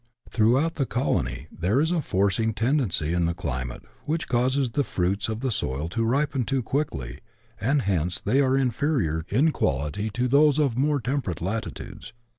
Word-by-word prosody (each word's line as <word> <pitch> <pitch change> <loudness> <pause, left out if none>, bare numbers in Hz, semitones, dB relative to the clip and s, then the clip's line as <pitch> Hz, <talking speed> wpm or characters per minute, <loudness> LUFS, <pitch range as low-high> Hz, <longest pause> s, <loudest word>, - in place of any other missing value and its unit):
Throughout 130 +9 +2
the 135 -4 0
colony 70 - -1
there 95 +10 0
is 160 +3 +2
a 175 -2 +1
forcing 100 0 +1
tendency 115 - +1
in 85 -1 +1
the 85 0 -1
climate, 65 -8 -4 0.2
which 160 +2 -1
causes 130 +1 +1
the 145 - +1
fruits 100 0 -1
of 110 - -2
tlie 130 -3 0
soil 75 -2 -2
to 115 +5 -1
ripen 140 +3 +1
too 130 +2 -1
quickly, 70 - -3 0.4
and 135 +6 +1
hence 90 -3 0
they 130 +7 +2
are 135 -1 +3
inferior 120 - 0
in 140 +10 +3
quality 75 - -1
to 120 +4 -1
those" 145 +2 +4
of 140 -6 +2
more 145 +3 +2
temperate 125 - -2
latitudes. 110 +4 -5
115 Hz, 170 wpm, -25 LUFS, 90-140 Hz, 0.4 s, those